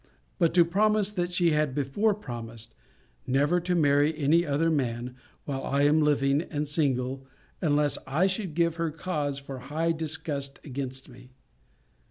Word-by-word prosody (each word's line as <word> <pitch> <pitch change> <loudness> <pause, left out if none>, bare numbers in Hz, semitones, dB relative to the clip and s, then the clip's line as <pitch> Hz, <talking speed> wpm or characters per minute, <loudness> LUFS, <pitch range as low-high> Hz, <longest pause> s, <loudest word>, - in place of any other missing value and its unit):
but 170 -3 +3
to 175 -1 +5
promise 210 +3 +2
what 175 -1 -1
she 175 -1 +2
had 150 -3 +1
before 150 +10 +1
promised, 115 - -6 0.5
'Never 145 +7 +2
to 180 +1 -1
marry 145 -1 +3
any 155 +3 +3
other 160 +2 +1
man, 125 -4 -2 0.3
while 135 -2 -3
I 140 +1 +1
am 150 +2 +4
living, 140 -1 +2
and 150 -3 -3
single, 135 -3 -1 0.3
unless 150 -3 +1
I 155 +7 +2
should 190 -4 -2
give 170 -1 +1
her 165 -1 0
cause 150 -3 -3
for 140 -1 -7
high 155 +6 -1
disgust 150 -3 -3
against 135 -1 -6
me.' 125 -1 -15
150 Hz, 155 wpm, -27 LUFS, 135-170 Hz, 0.5 s, to